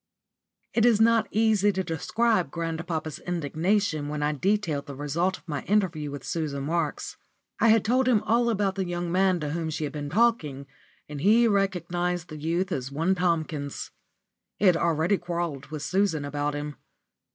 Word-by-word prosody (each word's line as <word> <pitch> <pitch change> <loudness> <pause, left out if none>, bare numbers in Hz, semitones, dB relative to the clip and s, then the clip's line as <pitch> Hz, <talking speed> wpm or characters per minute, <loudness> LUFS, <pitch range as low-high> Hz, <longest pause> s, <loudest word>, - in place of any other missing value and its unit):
*_ - - -64 0.7
It 230 - +2
is 230 -3 +5
not 225 -1 +4
easy 215 -2 +3
to 190 +1 -1
describe 185 +2 0
grandpapa's 165 -1 -4
indignation 170 0 -1
when 150 0 -3
I 150 - +2
detailed 165 -2 0
the 140 - -7
result 165 +7 -1
of - - -25
my 145 -3 -3
interview 180 -8 +1
with 140 -2 -7
Susan 150 -4 -3
Marks. 160 +1 -2 0.4
I 225 -1 +6
told 245 +4 +1
him 230 -5 +3
all 235 +2 +2
about 200 -3 +1
the 190 -1 -2
young 175 0 -3
man 185 0 +3
to 150 -1 -2
whom 165 0 -2
she 155 0 -3
had 150 - -3
been 145 -1 -4
talking, 165 - +1 0.4
and 145 -1 -7
he 225 +6 +5
recognised 180 -3 0
the 155 - -7
youth 170 +5 -1
as 135 -4 -3
one 165 +7 +1
Tomkins. 160 -5 -2 0.7
He 210 - 0
had 180 -3 +6
already 165 +3 +1
quarrelled 170 -5 -3
with 150 -1 -6
Susan 185 -5 +1
about 145 +1 -2
him. 145 0 -5
170 Hz, 175 wpm, -26 LUFS, 150-200 Hz, 0.7 s, I